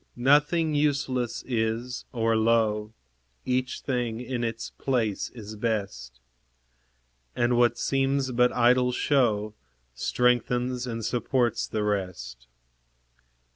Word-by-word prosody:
Nothing 150 Hz, +5 st, +3 dB
useless 140 Hz, -5 st, 0 dB
is, 115 Hz, +1 st, -2 dB
or 115 Hz, -2 st, +1 dB
low; 110 Hz, -1 st, +2 dB, 0.5 s
Each 130 Hz, 0 st, -1 dB
thing 120 Hz, -4 st, -2 dB
in 125 Hz, -1 st, -3 dB
its 115 Hz, -1 st, -4 dB
place 115 Hz, -7 st, -1 dB
is 110 Hz, -2 st, -8 dB
best; 105 Hz, -, -3 dB, 1.2 s
And 120 Hz, 0 st, +2 dB
what 120 Hz, 0 st, +3 dB
seems 135 Hz, -1 st, 0 dB
but 125 Hz, 0 st, +3 dB
idle 125 Hz, +1 st, +3 dB
show 110 Hz, -6 st, +1 dB, 0.4 s
Strengthens 125 Hz, -, 0 dB
and 115 Hz, -2 st, -4 dB
supports 120 Hz, -1 st, 0 dB
the 110 Hz, -, -2 dB
rest. 90 Hz, -12 st, -3 dB
120 Hz, 100 wpm, -26 LUFS, 110-125 Hz, 1.2 s, Nothing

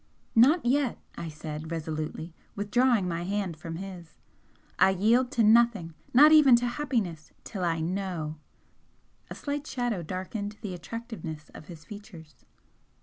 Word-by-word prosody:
"Not 270 Hz, +7 st, +5 dB
yet!" 265 Hz, 0 st, +2 dB, 0.2 s
I 170 Hz, -, -5 dB
said, 155 Hz, 0 st, -7 dB
resolutely, 160 Hz, 0 st, -4 dB, 0.2 s
withdrawing 210 Hz, 0 st, +2 dB
my 170 Hz, -1 st, -2 dB
hand 190 Hz, -1 st, -2 dB
from 165 Hz, +1 st, -7 dB
his 180 Hz, -2 st, -8 dB, 0.6 s
"I -, -, +6 dB
yield 225 Hz, +7 st, +3 dB
to 235 Hz, -, +3 dB
nothing 215 Hz, -6 st, +4 dB, 0.2 s
not 295 Hz, +5 st, +8 dB
even 295 Hz, -5 st, +8 dB
to 240 Hz, +1 st, +1 dB
happiness 240 Hz, -, -2 dB
till 195 Hz, -4 st, -5 dB
I 165 Hz, -2 st, 0 dB
KNOW!" 175 Hz, -3 st, -3 dB, 0.9 s
A -, -, -7 dB
slight 290 Hz, +1 st, -4 dB
shadow 245 Hz, -7 st, -2 dB
darkened 200 Hz, +5 st, -5 dB
the 205 Hz, -5 st, -5 dB
attractiveness 180 Hz, -5 st, -7 dB
of 155 Hz, -, -12 dB
his 165 Hz, -3 st, -11 dB
features. 200 Hz, -8 st, -11 dB
195 Hz, 140 wpm, -28 LUFS, 165-240 Hz, 0.9 s, not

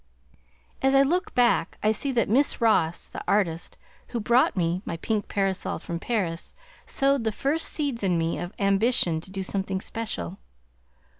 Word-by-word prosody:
As 270 Hz, 0 st, +3 dB
I 270 Hz, -, +7 dB
look 355 Hz, +7 st, 0 dB
back 245 Hz, -1 st, +2 dB
I 215 Hz, -, +4 dB
see 270 Hz, +6 st, -1 dB
that 235 Hz, -3 st, +2 dB
Miss 265 Hz, +7 st, +2 dB
Ross, 175 Hz, -8 st, +2 dB
the -, -, -8 dB
artist 175 Hz, -5 st, 0 dB, 0.3 s
who 240 Hz, -, -3 dB
brought 235 Hz, 0 st, +3 dB
me 175 Hz, +1 st, 0 dB
my 165 Hz, -, -4 dB
pink 210 Hz, +4 st, -2 dB
parasol 195 Hz, -2 st, -1 dB
from 170 Hz, 0 st, -5 dB
Paris, 175 Hz, -7 st, -2 dB, 0.3 s
sowed 275 Hz, -2 st, +2 dB
the 220 Hz, -, +1 dB
first 285 Hz, +9 st, 0 dB
seeds 280 Hz, -6 st, -2 dB
in 185 Hz, -4 st, +1 dB
me 165 Hz, 0 st, -1 dB
of 175 Hz, +1 st, -5 dB
ambition 195 Hz, -4 st, +2 dB
to 180 Hz, -, -12 dB
do 190 Hz, 0 st, -4 dB
something 190 Hz, 0 st, -2 dB
special. 195 Hz, -, -5 dB
205 Hz, 165 wpm, -26 LUFS, 175-245 Hz, 0.3 s, I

